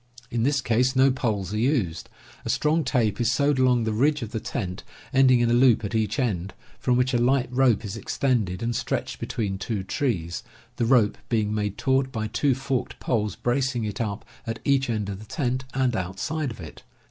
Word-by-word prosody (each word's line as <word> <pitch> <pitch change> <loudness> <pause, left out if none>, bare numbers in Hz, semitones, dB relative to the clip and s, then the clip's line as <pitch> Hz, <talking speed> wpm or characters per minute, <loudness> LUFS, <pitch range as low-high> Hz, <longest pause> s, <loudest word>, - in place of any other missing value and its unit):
In 115 - 0
this 140 +3 +2
case 125 +2 +2
no 135 +1 +5
poles 105 -7 -2
are 105 - -1
used. 115 - 0 0.3
A 115 - -5
strong 155 +7 +2
tape 120 -5 +1
is 120 - +2
sewed 140 +1 +2
along 125 -2 +3
the 110 -1 -1
ridge 140 +4 +2
of 110 - -7
the 110 - -2
tent, 95 -5 -4 0.3
ending 130 -2 +5
in 120 -1 +2
a - - +4
loop 120 -3 +4
at 105 - -5
each 110 -1 0
end, 100 -8 -1 0.2
from 125 -1 +2
which 125 +1 +1
a 120 - +3
light 130 +1 +2
rope 125 -4 +3
is 100 +1 -5
extended 115 -6 -1
and 120 0 -1
stretched - - -2
between 100 -4 -3
two 100 -1 -3
trees, 95 - -2 0.4
the 120 - +1
rope 115 -4 +3
being 110 -3 +1
made 105 -2 -2
taut 130 0 +1
by 110 -4 -3
two 120 +5 +1
forked 135 -1 -3
poles 105 -5 -1
bracing 125 -1 0
it 105 +1 -3
up 105 -1 -3 0.2
at 115 0 -2
each 135 -2 +2
end 105 -3 -1
of 100 -1 -5
the 110 - -10
tent, 130 0 -2
and 130 -3 +1
outside 95 - -2
of 110 - -9
it. 80 -3 -10
120 Hz, 205 wpm, -25 LUFS, 105-130 Hz, 0.4 s, no